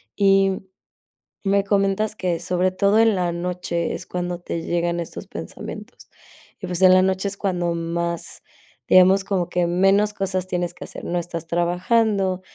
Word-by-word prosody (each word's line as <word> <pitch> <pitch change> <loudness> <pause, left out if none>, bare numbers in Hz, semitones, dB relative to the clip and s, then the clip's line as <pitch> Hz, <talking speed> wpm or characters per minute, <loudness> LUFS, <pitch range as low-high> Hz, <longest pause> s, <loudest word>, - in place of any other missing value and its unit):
y 195 -1 +3 0.8
me 200 0 +2
comentas 200 +1 +1
que, 180 -4 -1
sobre 180 +2 0
todo 200 +3 +2
en 225 -2 +4
la 180 -2 0
noche 170 -1 -3
es - - -6
cuando 175 -1 -3
te 170 -1 -4
llegan 170 0 -1
estos 170 - -6
pensamientos, - - -9 0.5
y - - -5
pues, 180 -1 -2
en 185 0 +8
la 185 - +6
noche 190 +1 0
es 200 - -6
cuando 175 -3 -1
más, 170 0 -3 0.4
digamos 190 +1 +6
como 185 -4 -1
que, 175 -1 +1
menos 195 +4 +3
cosas 190 -2 -2
tienes 175 -1 -2
que - - -9
hacer. - - -9
No 175 - -2
estás 170 -1 -6
trabajando, 185 +3 +1
185 Hz, 165 wpm, -22 LUFS, 175-195 Hz, 0.8 s, en